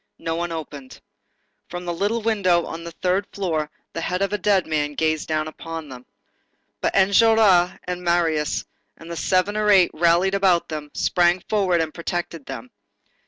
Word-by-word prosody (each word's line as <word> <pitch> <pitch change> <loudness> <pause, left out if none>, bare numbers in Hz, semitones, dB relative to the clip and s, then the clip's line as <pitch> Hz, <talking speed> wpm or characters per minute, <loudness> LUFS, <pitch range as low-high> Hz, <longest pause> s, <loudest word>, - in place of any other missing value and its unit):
No 165 0 -3
one 170 +1 -3
opened. 145 -5 -8 0.7
From 175 0 -6
the 175 - -2
little 210 +6 -1
window 185 -6 +2
on 165 +1 -7
the 170 - -7
third 185 +4 -1
floor, 160 -6 -2 0.2
the 165 - -4
head 180 +3 -1
of 195 - -1
the 210 - 0
dead 195 -1 +2
man 150 -2 -1
gazed 155 0 0
down 155 -1 -1
upon 160 -1 -7
them. 125 -1 -11 0.7
But - - 0
Enjolras 200 -2 +4
and 180 0 -4
Marius, 170 -3 0 0.3
and 165 +1 -11
the - - -4
seven 185 +4 +1
or 215 0 +1
eight 190 -4 +5
rallied 170 +4 +3
about 190 -3 +2
them, 150 -2 -5
sprang 175 0 +2
forward 190 -5 +2
and 155 -1 -3
protected 170 -3 -4
them. 255 - -8
175 Hz, 170 wpm, -22 LUFS, 160-195 Hz, 0.7 s, eight